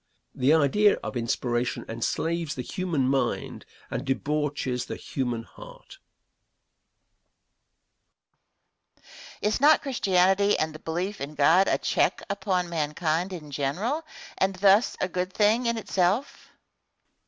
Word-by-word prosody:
The 135 +4 +3
idea 200 +8 +4
of - - -5
inspiration 120 0 -1
enslaves 160 +8 -2
the 125 - -4
human 170 -5 -1
mind 130 -2 -2 0.2
and - - -3
debauches 140 -2 -2
the - - -5
human 120 -4 -3
heart. - - -14 3.0
Question. - - -17
Is 210 +4 0
not 305 +2 +6
Christianity 200 -6 +2
and 155 0 -1
the 155 - -10
belief 180 +6 -4
in 145 +2 -5
God 165 +7 +4
a - - +2
check - - 0
upon 190 -3 -1
mankind 160 +2 -1
in 155 -5 -8
general 185 - -2 0.4
and 190 0 +1
thus 200 +4 +4
a - - 0
good 180 0 -3
thing 220 +3 +2
in 235 0 0
itself? 200 +4 -1
170 Hz, 120 wpm, -26 LUFS, 140-200 Hz, 3.0 s, not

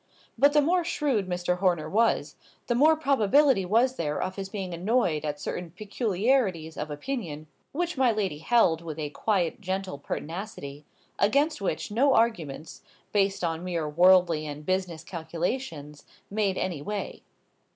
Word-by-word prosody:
But 285 +4 +4
the 295 -1 +5
more 350 +4 +2
shrewd 280 - -1
Mr. 180 0 -1
Horner 175 -5 +1
was, 225 +7 +1 0.3
the 240 - 0
more 305 +6 +5
probability 275 -5 +3
was 240 +7 +2
there 150 -2 -2
of 185 - -3
his 195 -1 -5
being 190 -3 -5
annoyed 175 -4 +1
at 150 -1 -3
certain 175 +3 -4
peculiarities 200 - 0
of 150 +1 -4
opinion 155 - -5 0.3
which 345 +1 -2
my 255 -3 +4
lady 195 -9 -2
held 165 -4 +3
with 160 -2 -7
a 150 -2 -4
quiet, 190 0 -1
gentle 190 -5 -3
pertinacity; 150 -3 -6 0.3
against 280 +7 +2
which 190 0 -2
no 260 +5 +3
arguments, 165 -10 -1 0.3
based 195 -2 +1
on 165 0 -1
mere 170 -4 -2
worldly 170 -1 +4
and 150 0 -7
business 185 -3 -1
calculations, 165 - -4 0.3
made 200 -2 0
any 170 -6 -2
way. 205 +6 -5
185 Hz, 150 wpm, -27 LUFS, 160-230 Hz, 0.3 s, the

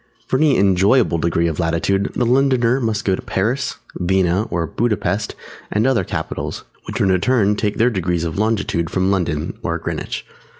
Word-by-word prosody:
For 130 - 0
any 145 -1 +3
enjoyable 95 0 +3
degree 85 +1 +1
of 80 -3 -3
latitude, 85 +4 0
the 125 - +1
Londoner 130 -1 +3
must 110 -3 -1
go 95 - +2
to - - -2
Paris, 120 +8 -1 0.2
Vienna 95 +3 +1
or 85 -1 -1
Buda 115 +6 0
Pesth 105 +1 -2 0.3
and 105 +3 +1
other 130 -7 +2
capitals, - - -4 0.2
which - - -4
in 95 - +3
return 105 +2 +2
take 105 0 -1
their 120 +2 +3
degrees 90 -4 -1
of 85 +3 -3
longitude 100 -7 0
from 95 +2 +1
London 85 -5 -1
(or - - -1
Greenwich). - - -4
100 Hz, 175 wpm, -19 LUFS, 90-115 Hz, 0.3 s, any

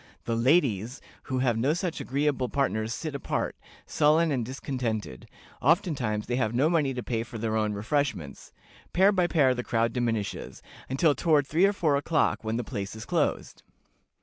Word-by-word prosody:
The 115 - -1
ladies 125 - +2 0.3
who 130 - -2
have 125 -3 +1
no 140 +7 +2
such 175 -1 -3
agreeable 135 -2 0
partners 110 -5 -1
sit 155 +5 -4
apart, 140 - -2 0.3
sullen 155 +2 +3
and 130 -4 0
discontented; 115 - -4 0.3
oftentimes 135 - +1
they 120 - -1
have 120 -3 0
no 145 +6 +3
money 150 -5 +2
to 125 - -4
pay 115 -2 -2
for 115 0 -7
their 110 0 -2
own 110 -1 0
refreshments. 105 - -2 0.4
Pair 190 +3 +5
by 180 -3 +2
pair 140 -7 +3
the 125 -1 -4
crowd 115 -1 0
diminishes, 115 -5 -3 0.3
until 145 +4 +3
toward 150 -2 +2
three 165 +7 +3
or - - +2
four 155 -7 +1
o'clock, 155 -1 +1
when 110 +1 -2
the 120 - -2
place 105 -3 -5
is 110 - -8
closed." - - -1
130 Hz, 175 wpm, -27 LUFS, 115-150 Hz, 0.4 s, Pair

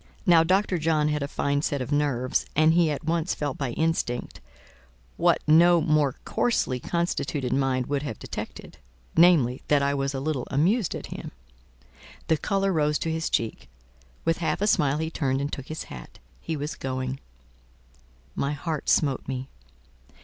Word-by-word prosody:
Now 170 -2 +6
Dr. 185 +1 +1
John 155 -1 +2
had 150 -1 -1
a 140 - -1
fine 140 0 0
set 145 -2 -1
of 130 +2 -5
nerves, 140 -4 0
and 155 +2 +5
he 170 -1 +4
at 150 +1 -3
once 165 +2 0
felt 145 -3 -3
by 135 -3 -1
instinct, 160 -6 -2 0.7
what - - +3
no 170 +3 +6
more 150 -4 +2
coarsely 135 - 0
constituted 150 -4 -2
mind 130 -2 +1
would 140 +1 -1
have 130 -7 -5
detected; - - -8 0.4
namely, 160 -8 +5
that 145 -1 +3
I 140 0 +1
was 135 0 -1
a - - -2
little 140 -2 -2
amused 175 - +1
at - - -6
him. - - -7 1.0
The 160 - +4
colour 195 +3 0
rose 150 -2 +2
to 165 - -2
his 160 +1 -2
cheek; 115 -1 -2 0.6
with 165 0 +1
half 160 -3 -1
a 205 - +1
smile 145 -8 +2
he 160 +1 -2
turned 135 -4 0
and 140 +1 -3
took 135 - -6
his 155 - -5
hat—he 65 - -9
was 145 +2 -4
going. 130 0 -4 1.1
My 140 +1 -1
heart 150 +1 -3
smote 140 -4 +2
me. 130 0 -4
150 Hz, 165 wpm, -26 LUFS, 135-165 Hz, 1.1 s, Now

